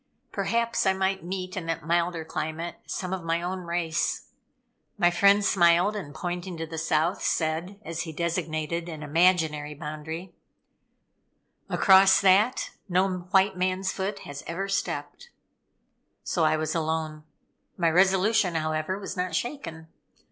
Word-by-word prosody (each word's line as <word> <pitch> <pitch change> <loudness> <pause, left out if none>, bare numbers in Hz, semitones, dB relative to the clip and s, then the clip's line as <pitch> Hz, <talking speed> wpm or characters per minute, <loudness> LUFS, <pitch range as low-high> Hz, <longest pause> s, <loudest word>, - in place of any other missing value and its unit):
Perhaps 235 -3 0
I 190 - +4
might 190 0 -1
meet 185 +1 -5
in 180 -4 -4
that 165 -2 -3
milder 170 0 0
climate 160 +2 -4
some 185 0 -3
of 190 - -3
my 165 0 0
own 180 +2 -3
race. 170 -2 -1 0.7
My 175 -3 +4
friend 200 +3 +4
smiled, 175 +2 +4
and 185 -9 -5
pointing 175 0 -4
to 165 - -3
the 160 0 -6
South, 160 +2 +1
said, 165 +5 -1
as 165 0 -4
he 165 -2 -5
designated 170 0 -2
an 155 -2 -7
imaginary 155 -2 +2
boundary: 160 +4 -7 1.4
"Across 190 0 +6
that 200 +6 +3 0.2
no 185 +2 +3 0.2
white 195 0 +3
man's 185 +1 0
foot 195 +1 -4
has 145 0 -8
ever 190 +4 -3
stepped." 200 - -3 0.9
So 165 -3 +1
I 155 0 +3
was 155 0 -2
alone. 160 -1 -2 0.5
My 170 -2 +2
resolution, 190 +1 +3
however, 155 +3 -1
was 200 - -6
not 180 -2 -2
shaken. 185 - -4
175 Hz, 140 wpm, -26 LUFS, 160-190 Hz, 1.4 s, Across